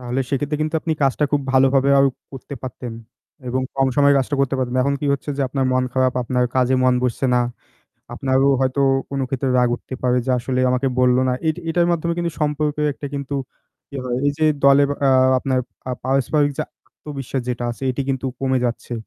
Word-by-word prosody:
তাহলে 125 +1 -2
সেক্ষেত্রে 145 +2 -1
কিন্তু 155 +1 -3
আপনি 160 - -1
কাজটা 135 +2 +2
খুব 145 - +3
ভালোভাবে 135 +1 +4
আরো 135 - +5 0.2
করতে 135 +2 -8
পারতেন। 125 -1 -6 0.6
এবং 130 +1 -1
কম 135 - +3
সময়ে 140 0 +5
কাজটা 135 +2 -1
করতে 135 0 +1
পারতেন। 130 -1 -1
এখন 140 +2 +1
কি 145 - -2
হচ্ছে 140 +1 -3
যে 140 - 0
আপনার 135 0 -1
মন 130 0 +2
খারাপ 130 -1 +1
আপনার 125 +1 0
কাজে 130 0 +2
মন 125 -1 +4
বসছে 125 +2 0
না। 125 - +3 0.7
আপনারও 135 0 +2
হয়তো 130 +1 0 0.3
কোন 140 - -2
ক্ষেত্রে 135 0 -1
রাগ 125 -1 +4
উঠতে 130 - -9
পারে 125 0 +2
যে - - +1
আসলে 130 +1 -1
আমাকে 125 +2 +1
বলল 125 -1 +4
না। - - +2 0.2
এট 155 - 0
এটার 170 +1 +2
মাধ্যমে 170 0 0
কিন্তু 170 -1 -1
সম্পর্কে 150 0 0
একটা 145 - -7
কিন্তু 140 0 -4 0.5
কি 140 - -15
হয় 125 -1 -2
এই - - +4
যে 155 - +2 0.2
দলে 140 +1 +6 0.3
আ - - +5 0.3
আপনার 130 0 0 0.3
আ - - -1
পারস্পরিক 135 +3 +1
যে - - +1 0.3
আত্মবিশ্বাস 135 -3 -5
যেটা 120 -1 -2
আছে 120 - -9
এটি 130 +2 -2
কিন্তু 135 -1 -1
কমে 130 -1 +1
যাচ্ছে। 120 0 -3
135 Hz, 200 wpm, -21 LUFS, 125-140 Hz, 0.7 s, দলে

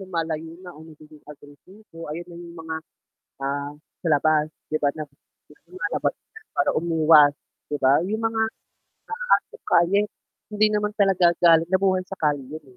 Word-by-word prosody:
lumalayo 165 -3 -4
na 180 - -9
o 155 - -15
nagiging 155 -1 -15
agresibo, 165 +5 -13
ayun 165 +3 -5
na - - -10
yung 170 0 -11
mga, 160 0 -4 0.6
ah, 140 +1 -3 0.3
sa - - +1
labas 150 +1 +3 0.2
'di 155 - -1
ba 145 -1 +2
na 155 0 -6 0.6
lumalabas 370 0 -2 0.4
para - - +1
umiwas 155 -3 +5 0.4
'di 145 - -1
ba. 135 +5 +4
Yung 215 +4 -2
mga 225 0 0 0.9
asong 460 - -14
kalye 180 +4 +3 0.5
hindi 210 +1 +4
naman 210 0 -1
talaga 190 -4 +3
galing 165 -1 +6
nabuhay 190 -1 +2
sa 195 - -7
kalye 145 -3 0
yun 155 +4 -9
165 Hz, 150 wpm, -24 LUFS, 150-190 Hz, 0.9 s, galing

